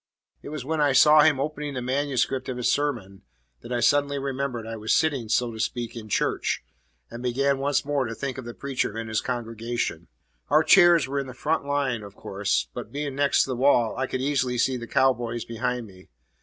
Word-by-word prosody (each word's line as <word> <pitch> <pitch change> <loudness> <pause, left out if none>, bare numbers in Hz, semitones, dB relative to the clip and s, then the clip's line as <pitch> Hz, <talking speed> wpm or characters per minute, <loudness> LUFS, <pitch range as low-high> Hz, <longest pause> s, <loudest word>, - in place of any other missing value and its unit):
It - - -9
was 150 -4 -6
when 160 +1 -1
I 145 -2 +3
saw 150 +3 +7
him 150 -3 +4
opening 150 0 -3
the 125 - -3
manuscript 130 0 -1
of 125 - -3
his 125 - +1
sermon 120 -10 -2 0.4
that 120 - -11
I 120 -1 0
suddenly 140 +3 +2
remembered 135 -4 -3
I 115 0 -5
was 110 0 0
sitting, 140 -8 0
so 120 +1 +1
to 110 - -9
speak, 120 +1 -3
in 110 -2 -8
church, - - 0 0.5
and 120 - -7
began 135 +3 +1
once 140 0 0
more 145 -2 0
to 115 0 -5
think 130 0 -4
of 130 - -8
the 120 - -8
preacher 130 -5 -2
and 115 0 -5
his 110 -1 0
congregation. 120 -1 -3 0.4
Our 155 - +5
chairs 175 -6 +6
were 140 +1 -2
in 135 - -4
the 130 - -9
front 155 +2 -1
line, 140 -5 -1
of 100 -1 -11
course; 100 +1 -1
but, - - -7
being 145 0 -3
next 140 0 +3
the 130 - -3
wall, 120 -3 +3
I 130 - -1
could 130 - -3
easily 130 -3 0
see 130 +2 +2
the 120 -1 -6
cow 130 +2 +3
boys 120 -1 -5
behind 125 +1 -3
me. 95 -3 -16
130 Hz, 215 wpm, -25 LUFS, 120-140 Hz, 0.5 s, saw